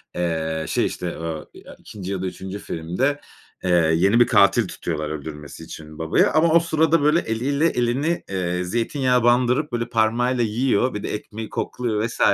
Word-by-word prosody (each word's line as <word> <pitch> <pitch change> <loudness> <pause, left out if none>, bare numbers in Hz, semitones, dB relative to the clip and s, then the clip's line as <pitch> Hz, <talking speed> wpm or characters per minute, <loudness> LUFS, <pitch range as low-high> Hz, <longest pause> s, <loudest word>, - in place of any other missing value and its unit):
Eee, 80 -2 -2
şey - - +1
işte, 90 -1 -4
ooo, 80 -1 -5
eee, - - -14 0.2
2. 100 -2 -8
ya 95 -2 -3
da - - -2
3. 95 +2 -6
filmde, 100 - -2 0.4
eee, 90 - -1 0.3
yeni 100 +7 +3
bir 120 - +6
katil 100 -4 +4
tutuyorlar, 75 -3 -4
öldürmesi 75 0 -7
için 80 -1 -10
babaya 80 0 +2
ama 160 +1 +4
o 170 - +7
sırada, 160 -1 +2
böyle, 150 +3 +4
eliyle 140 +6 0
elini, 135 +5 0
eee, 90 -2 -1
zeytinyağa 125 - 0
bandırıp 125 +4 +2
böyle 120 -1 -2
parmağıyla 120 +2 +1
yiyor. 120 +2 +1
Bir 105 - -5
de - - -3
ekmeği 110 +1 -6
kokluyor 110 -2 -2
vs. - - -9
110 Hz, 170 wpm, -22 LUFS, 90-125 Hz, 0.4 s, o